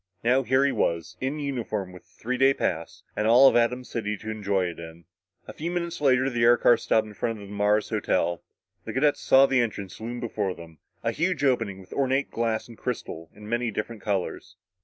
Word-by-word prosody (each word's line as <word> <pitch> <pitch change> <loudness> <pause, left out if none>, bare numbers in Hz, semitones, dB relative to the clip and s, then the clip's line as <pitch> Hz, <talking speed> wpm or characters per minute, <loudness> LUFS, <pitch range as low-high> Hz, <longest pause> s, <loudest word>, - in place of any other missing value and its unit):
Now 125 +3 +3
here 130 +1 +2
he 140 - +2
was 85 -1 -1
in 135 +3 -2
uniform, 120 -9 -3
with 90 - -12
a - - -31
three 130 +3 -2
day 135 +1 +5
pass, - - -3
and 105 - 0
all 125 +4 +8
of - - +4
Atom 120 +2 +2
City 105 -4 -3
to 110 +2 -6
enjoy 100 -3 0
it 85 -1 -5
in. 80 0 -11 0.4
A - - -8
few 165 +3 -4
minutes 175 -2 -3
later 130 -2 +3
the 120 -3 -1
air 120 +1 +6
car 120 - +5
stopped 110 -1 +1
in 105 - -11
front 115 +1 -3
of 100 - -10
the 100 - -9
Mars 105 +1 +1
Hotel. 90 -5 0 0.4
The - - -5
cadets 145 +3 +2
saw 135 +1 +6
the 130 -2 +2
entrance 105 -4 -4
loom 120 +2 -5
before 105 -5 -2
them 80 -2 -13 0.2
a - - +1
huge 170 -4 -1
opening, 115 -8 +1
with 95 - -13
ornate 135 0 0
glass 115 -1 -1
and 115 -2 -14
crystal 80 -9 -5
in 105 0 -12
many 120 +1 -1
different 105 +1 -5
colors. 95 -3 -3
115 Hz, 220 wpm, -26 LUFS, 100-130 Hz, 0.4 s, all